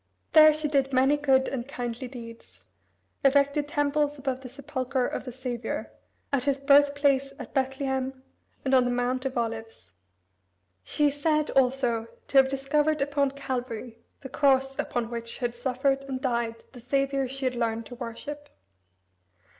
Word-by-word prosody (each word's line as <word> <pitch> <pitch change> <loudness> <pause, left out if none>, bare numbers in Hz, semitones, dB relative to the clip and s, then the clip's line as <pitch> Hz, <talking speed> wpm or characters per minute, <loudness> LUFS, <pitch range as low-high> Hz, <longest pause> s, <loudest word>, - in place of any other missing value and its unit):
There 310 -1 +9
she 305 0 -2
did 275 -2 +1
many 265 +2 +4
good 270 -2 +3
and 255 -2 -4
kindly 245 -2 -5
deeds, 230 -2 -11 0.6
erected 280 +1 +3
temples 290 0 0
above 265 -1 -3
the 255 - -8
Sepulchre 260 -1 -2
of - - -4
the 250 - -5
Saviour, 245 -2 -4 0.4
at 265 -2 +1
his 280 -1 +2
birthplace 280 -1 +4
at - - -9
Bethlehem, 265 -1 -1 0.4
and 265 - +1
on 255 -1 +5
the - - +1
Mount 245 +2 -1
of 265 -1 -2
Olives. 225 - -4 0.9
She 295 - +2
is 285 +1 -9
said, 305 0 +2
also, 250 -3 +2 0.2
to 275 - +2
have 265 0 +7
discovered 295 +3 +1
upon 280 0 +1
Calvary 250 -4 -5 0.2
the 265 - -8
cross, 270 -1 +2
upon 240 -1 -2
which 230 0 -5
had 240 -2 -2
suffered 265 +2 0
and 265 -1 -4
died 235 -3 -2
the 250 - -12
Saviour 275 +2 0
she 270 +1 -3
had 255 - +1
learned 230 -2 -1
to 245 - -10
worship. 265 +5 -7
265 Hz, 155 wpm, -27 LUFS, 245-280 Hz, 0.9 s, There